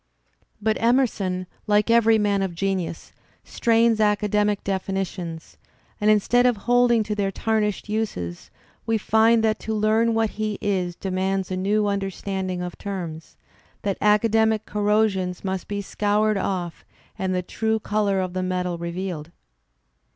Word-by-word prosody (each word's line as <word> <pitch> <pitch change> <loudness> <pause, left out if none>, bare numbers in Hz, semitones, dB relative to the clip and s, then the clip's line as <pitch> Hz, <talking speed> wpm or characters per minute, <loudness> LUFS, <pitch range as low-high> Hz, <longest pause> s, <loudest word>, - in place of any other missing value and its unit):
But 215 +1 0
Emerson, 220 -7 +1 0.2
like 210 +2 +3
every 225 -1 +5
man 205 -2 +1
of 190 -3 -2
genius, 185 -2 -3 0.3
strains 230 -1 +2
academic 210 -1 +1
definitions; 190 -4 -4 0.4
and 210 - +3
in 215 -1 +6
stead 245 +4 +3
of 245 -3 +2
holding 245 -1 +4
to 210 - -3
their 200 -2 0
tarnished 215 0 -1
uses, 205 - -3 0.4
we 225 0 +2
find 220 +2 +3
that 220 -1 +1
to 220 - -3
learn 220 +2 +2
what 225 -1 +1
he 215 -1 -3
is 185 -4 -1
demands 190 0 -2
a - - 0
new 205 +3 +1
understanding 195 -2 -2
of 175 -1 -7
terms, 170 -6 -6 0.5
that 200 -2 -2
academic 220 +1 +3
corrosions 205 -3 0
must 190 -1 -3
be 205 0 -3
scoured 210 +2 +1
off 180 -4 -3 0.4
and 185 -1 -1
the 180 - -1
true 220 +4 -1
colour 205 -2 0
of 185 -1 -3
the 185 - -2
metal 180 -1 -2
revealed. 170 -2 -4
205 Hz, 145 wpm, -23 LUFS, 185-220 Hz, 0.5 s, in